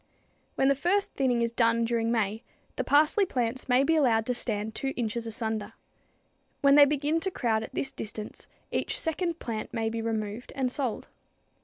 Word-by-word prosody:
When 270 - +2
the 275 - +5
first 360 +8 0
thinning 245 -3 +1
is 230 - 0
done 230 -1 +2
during 230 0 0
May, 220 -1 0 0.3
the - - -1
parsley 305 +8 +4
plants 255 -7 -2
may 250 +2 +5
be 325 +3 +2
allowed 235 -7 +3
to 250 - 0
stand 220 -3 -2
2 270 +3 -3
inches 230 0 -2
asunder. 220 -2 -3 0.9
When 280 0 +5
they 290 0 +9
begin 295 +3 0
to 380 - -1
crowd 230 -10 0
at 220 - -8
this 270 - -1
distance 215 0 -7 0.2
each - - 0
second 335 +1 -1
plant 225 -5 -5
may 225 -1 -1
be 230 0 -3
removed 220 0 -4
and 260 -2 0
sold. 255 -5 -3
240 Hz, 180 wpm, -28 LUFS, 225-280 Hz, 0.9 s, they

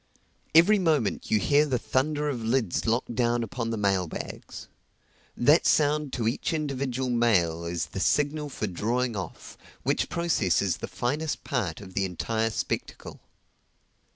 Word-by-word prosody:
Every 195 +6 +7
moment 155 - 0
you 110 - +4
hear 145 +7 +3
the 130 -3 +1
thunder 145 +5 0
of 130 -5 -2
lids 115 -5 0
locked 115 +1 0
down 120 0 +1
upon 115 +1 -4
the 115 - -2
mail 100 -3 +1
bags. - - -8 0.7
That 145 +7 +4
sound 150 -1 +2
to 115 -3 -1
each 125 +8 -1
individual 135 -4 -2
mail 90 -9 +2
is 85 -1 -2
the - - -7
signal 150 +7 +1
for 120 - -3
drawing 115 +5 -1
off, 95 -4 -7 0.2
which - - 0
process 170 - +1
is 95 -4 0
the - - -5
finest 145 +5 -2
part 125 -3 -2
of 95 -2 -11
the 100 0 0
entire 110 +5 -1
spectacle. 110 - -4
120 Hz, 155 wpm, -27 LUFS, 105-145 Hz, 0.7 s, Every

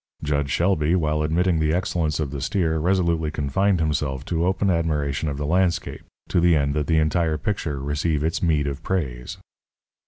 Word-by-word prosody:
Jud 70 -1 0
Shelby, 85 0 +2
while 75 -3 0
admitting 85 +2 +1
the 80 +1 +1
excellence 85 -4 -1
of 75 -4 -2
the 70 -2 -5
steer, 80 +2 0
resolutely 85 -2 +1
confined 85 +6 0
himself 75 -3 -1
to 85 0 0
open 95 +1 +1
admiration 75 -3 -1
of 70 - -4
the 75 - -3
landscape, 85 +2 0 0.3
to - - +2
the 85 -1 +4
end 70 -1 +1
that 75 0 -1
the 80 - +2
entire 80 0 +1
picture 80 -4 -3
receive 75 +2 -1
its 80 +1 -1
meed 80 -4 +2
of 70 +1 -4
praise. 70 -10 -3
80 Hz, 180 wpm, -23 LUFS, 75-85 Hz, 0.3 s, the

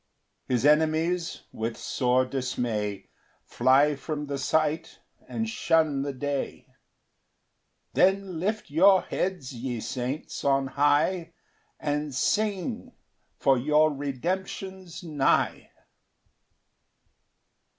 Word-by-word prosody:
4 - - -1
His 125 - 0
enemies, 160 +3 +2
with 115 +1 -4
sore 130 0 +1
dismay, 120 -6 -3 0.3
Fly 140 +3 +3
from 150 +1 -4
the 140 -1 -4
sight, 155 +3 0 0.3
and 225 0 -2
shun 160 -9 +1
the 140 +1 -2
day; 140 +1 -3 1.3
Then 190 -2 +2
lift 210 -2 -2
your 190 +5 +6
heads, 180 -9 -3
ye 120 0 -4
saints, 125 +6 -4
on 135 -1 +2
high, 150 +5 +1 0.5
And 150 -2 -2
sing, 205 - -1 0.4
for 135 -2 +3
your 150 +3 +3
redemption's 180 +6 -4
nigh. 150 -5 +1
150 Hz, 95 wpm, -27 LUFS, 135-175 Hz, 1.3 s, your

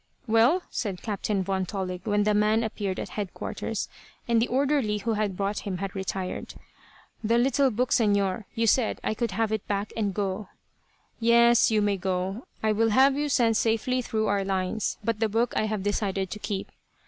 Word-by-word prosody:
"Well?" 240 +10 +4
said 195 -6 -3
Captain 205 -2 -1
Von 190 0 -1
Tollig, 185 -2 -4
when 205 0 +2
the 210 0 +2
man 215 +2 +3
appeared 205 -4 -3
at - - -5
headquarters, 205 -4 -4 0.4
and 230 -1 +3
the 235 - +1
orderly 265 -4 +1
who 225 +2 -1
had 210 -3 -1
brought 200 +1 -1
him 190 -3 -4
had 195 0 -4
retired. 190 -1 -4 0.7
"The 230 +2 +3
little 270 +2 +3
book, 250 +2 -1
Señor. 200 -2 +2
You 230 -1 +1
said 225 +1 +2
I - - 0
could 235 +2 -1
have 220 +2 -1
it 220 -2 -2
back, 205 0 -2
and 210 -3 0
go." 195 +1 -3 0.7
"Yes. 235 0 +5
You 215 -2 +2
may 205 -1 +1
go. 190 +4 -2 0.2
I 220 - +3
will 225 +2 +2
have 265 +5 +5
you 295 +1 -1
sent 230 -5 +3
safely 230 +3 +1
through 220 -2 -1
our 200 -1 +1
lines; 190 +2 -1
but 225 0 -1
the 220 -1 +1
book 230 +3 +1
I - - +1
have 210 -3 -2
decided 195 -2 -1
to 210 - -5
keep." 195 -2 -4
215 Hz, 190 wpm, -27 LUFS, 195-230 Hz, 0.7 s, Yes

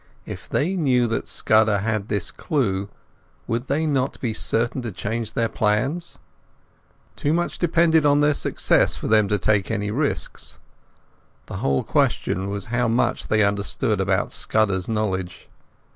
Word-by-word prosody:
If - - -9
they 175 +7 0
knew 130 -8 +2
that 115 - -2
Scudder 110 -1 +2
had 110 0 -2
this 100 -4 -2
clue, 100 - -1 0.6
would 120 +3 -3
they 150 +4 0
not 135 -4 -1
be 120 -4 -2
certain 120 +4 0
to 115 -2 -5
change 110 +3 -4
their 115 - +1
plans? 120 +12 -1 1.0
Too 145 - -1
much 175 +1 -1
depended 165 -2 +3
on 145 0 +4
their 145 0 +3
success - - +2
for - - -5
them 110 -1 +4
to 105 - +1
take 100 0 +1
any 105 -2 -2
risks. 140 +6 -1 0.9
The - - -7
whole 70 -1 0
question 95 +2 0
was 100 -1 -3
how 125 -1 +2
much 115 +2 0
they 110 -1 +3
understood 100 0 0
about 95 +1 0
Scudder's 100 -4 0
knowledge. 95 -5 -3
110 Hz, 150 wpm, -23 LUFS, 100-140 Hz, 1.0 s, on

